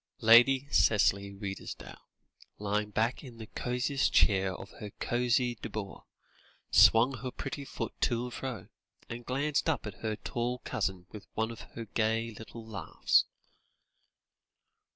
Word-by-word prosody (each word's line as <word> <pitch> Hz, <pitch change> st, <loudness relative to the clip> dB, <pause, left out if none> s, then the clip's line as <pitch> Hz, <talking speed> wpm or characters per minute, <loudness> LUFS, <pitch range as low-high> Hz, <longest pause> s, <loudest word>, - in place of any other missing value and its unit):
Lady 125 Hz, +5 st, +6 dB
Cicely 100 Hz, -2 st, +3 dB
Redesdale, 100 Hz, -1 st, -8 dB, 0.5 s
lying 105 Hz, +1 st, -1 dB
back 115 Hz, +7 st, 0 dB
in 125 Hz, -4 st, -11 dB
the 110 Hz, -, -8 dB
cosiest 125 Hz, +4 st, -1 dB
chair 95 Hz, -2 st, +3 dB
of -, -, -10 dB
her 105 Hz, -, -6 dB
cosy 120 Hz, -1 st, +1 dB
boudoir, 100 Hz, -3 st, -6 dB, 0.7 s
swung 120 Hz, +3 st, +6 dB
her 130 Hz, +3 st, -4 dB
pretty 140 Hz, +3 st, -6 dB
foot -, -, -5 dB
to 120 Hz, -1 st, +1 dB
and 125 Hz, -1 st, -6 dB
fro, 125 Hz, -7 st, -5 dB, 0.4 s
and 120 Hz, 0 st, -7 dB
glanced 145 Hz, +4 st, 0 dB
up 155 Hz, -, -1 dB
at 105 Hz, -3 st, -8 dB
her 110 Hz, -1 st, -1 dB
tall 120 Hz, +3 st, -3 dB
cousin 95 Hz, -2 st, -2 dB
with 105 Hz, -, -10 dB
one 110 Hz, +1 st, 0 dB
of 115 Hz, -, -9 dB, 0.2 s
her 115 Hz, -, -4 dB
gay 115 Hz, +2 st, 0 dB
little 110 Hz, +1 st, -10 dB
laughs. 110 Hz, -3 st, +1 dB
115 Hz, 135 wpm, -30 LUFS, 105-125 Hz, 0.7 s, Lady